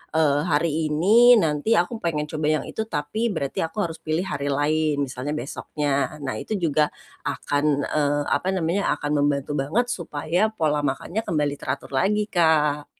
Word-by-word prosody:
eee, 145 -2 +3
hari 160 +1 +2
ini 205 +11 +6
nanti 150 +6 +1
aku 180 +5 +1
pengen 150 -6 -2
coba 155 -1 -3 0.2
yang - - -9
itu 220 - -3
tapi 180 +4 -2
berarti 140 -5 -4
aku 165 - -11
harus 165 -4 -3
pilih 160 +1 -2
hari 140 -6 -3
lain, 150 +1 +1
misalnya 135 +1 -3
besoknya. 145 0 -2
Nah 130 -6 -3
itu 215 - -5
juga, 155 -3 +1 0.3
akan, 145 0 0
eee, 145 -1 +1
apa - - 0
namanya 185 +2 0
akan 145 -1 -4
membantu 145 0 -1
banget 150 - +1
supaya 170 -1 -1
pola 155 -7 +1
makannya 145 +9 -2
kembali 150 -3 0
teratur 130 +1 -4
lagi 205 +10 +1
Kak. 150 -5 +2
150 Hz, 160 wpm, -24 LUFS, 145-170 Hz, 0.3 s, ini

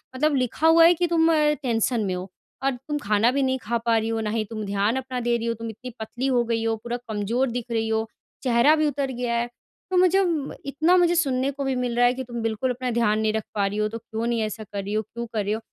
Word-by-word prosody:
मतलब 300 +2 +2
लिखा 255 +4 +1
हुआ 330 0 +7
है 340 - +7
कि 350 +1 0
तुम 330 -1 +3
अ, - - +4 0.3
टेंशन 235 -1 +1
में 185 - -1
हो। 180 +2 -6 0.3
और 275 - +3
तुम 270 +4 -4
खाना 215 -1 +2
भी 280 - 0
नहीं 260 0 +1
खा 235 +2 0
पा 230 -1 +3
रही 220 0 -1
हो, 225 0 -1
ना 215 - -2
ही 220 0 0
तुम 215 -1 -5
ध्यान 200 +3 0
अपना 260 -1 -4
दे 240 - +3
रही 230 - -4
हो, 230 - +1
तुम 230 0 -6
इतनी 225 +4 -8
पतली 225 +4 -3
हो 250 -3 +2
गई 230 -1 -1
हो, 225 0 +1
पूरा 240 0 -3
कमज़ोर 220 +5 0
दिख 240 -1 -3
रही 225 -1 0
हो, 220 0 0 0.4
चेहरा 250 +4 +5
भी 310 -1 +2
उतर 280 -1 -2
गया 245 -1 -2
है। 235 0 0 0.4
तो 370 - +2
मुझे 370 +1 +5
म 315 -5 -2
इतना 310 +6 +2
मुझे 350 -1 +4
सुनने 270 -5 +1
को 280 0 -5
भी 270 -1 0
मिल 250 -1 -1
रहा 245 - +5
है 245 - +4
कि 260 +1 -5
तुम 240 -1 -6
बिल्कुल 225 +3 -1
अपना 250 +1 -3
ध्यान 220 -2 +2
नहीं 220 0 +1
रख 220 -1 -1
पा 200 -1 +2
रही 200 +1 -4
हो, 215 0 +1
तो 225 - -6
क्यों 225 0 -5
नहीं 235 -1 0
ऐसा 215 0 -3
कर 200 -1 -6
रही 200 +2 -4
हो, 215 - +1
क्यों 235 +3 -7
कर 215 -2 0
रही 205 +1 -1
हो? 220 - -2
235 Hz, 285 wpm, -24 LUFS, 220-270 Hz, 0.4 s, हुआ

